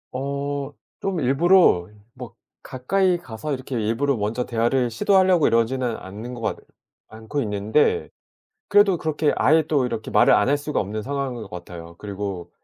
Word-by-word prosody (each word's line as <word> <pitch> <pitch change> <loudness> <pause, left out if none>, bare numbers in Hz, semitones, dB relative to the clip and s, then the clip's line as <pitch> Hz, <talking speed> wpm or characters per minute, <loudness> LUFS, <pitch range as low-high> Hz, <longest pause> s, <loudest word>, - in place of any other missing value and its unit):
어 140 +1 -3 0.3
좀 195 -3 -2
일부러 140 - +4 0.3
뭐 125 -3 -10 0.3
가까이 180 +8 0
가서 145 -2 -6
이렇게 130 0 -5
일부러 120 +6 0
먼저 110 +4 -2
대화를 120 +1 0
시도하려고 185 - +3
이러지는 115 +1 +1
않는 105 +6 -8
것 120 - -9
같 - - -2 0.5
않고 110 +6 -5
있는데 110 - 0 0.6
그래도 205 -3 +4
그렇게 155 -1 0
아예 160 +1 +4
또 140 -5 +2
이렇게 - - -5
말을 - - +5
안 - - +2
할 145 +1 +2
수가 150 +1 -2
없는 105 +2 -4
상황인 135 -2 -4
것 105 - -9
같아요. 85 -1 -9
그리고 100 -3 -6
130 Hz, 335 characters per minute, -23 LUFS, 110-150 Hz, 0.6 s, 말을